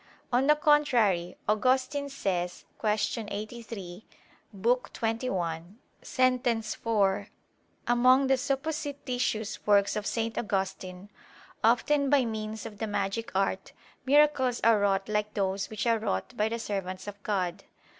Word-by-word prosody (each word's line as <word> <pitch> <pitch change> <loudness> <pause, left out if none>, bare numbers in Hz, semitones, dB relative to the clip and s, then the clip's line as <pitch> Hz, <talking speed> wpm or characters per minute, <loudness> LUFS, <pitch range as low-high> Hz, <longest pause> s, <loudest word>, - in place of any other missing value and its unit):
On 255 +3 +3
the 300 - +6
contrary, 240 - +2
Augustine 260 +6 +1
says 180 -9 -3
(Q. 215 +1 0
83) 210 -3 -7 0.5
[*Lib. 200 0 -12 0.3
xxi, 195 -8 -2 0.4
Sent. 255 -1 +1
sent 230 -3 0
4, 205 -3 0 0.6
among 255 +3 +5
the 265 0 +4
supposititious 270 -5 -2
works 200 -1 +4
of 210 -1 -2
St. 230 -1 -1
Augustine]: 195 -2 -3 0.5
"Often 275 +5 +3
by 275 -3 +4
means 220 -1 -4
of 205 -2 -9
the 220 - -2
magic 205 +2 -2
art 195 0 -1 0.3
miracles 270 -2 +3
are 225 -2 +5
wrought 195 -1 +1
like 210 0 -1
those 195 -1 -1
which 215 +1 -4
are 230 -1 +3
wrought 95 - -3
by 215 +1 +1
the 230 - -2
servants 190 -4 -4
of 205 0 -8
God." 185 -4 -2
220 Hz, 130 wpm, -28 LUFS, 200-255 Hz, 0.6 s, the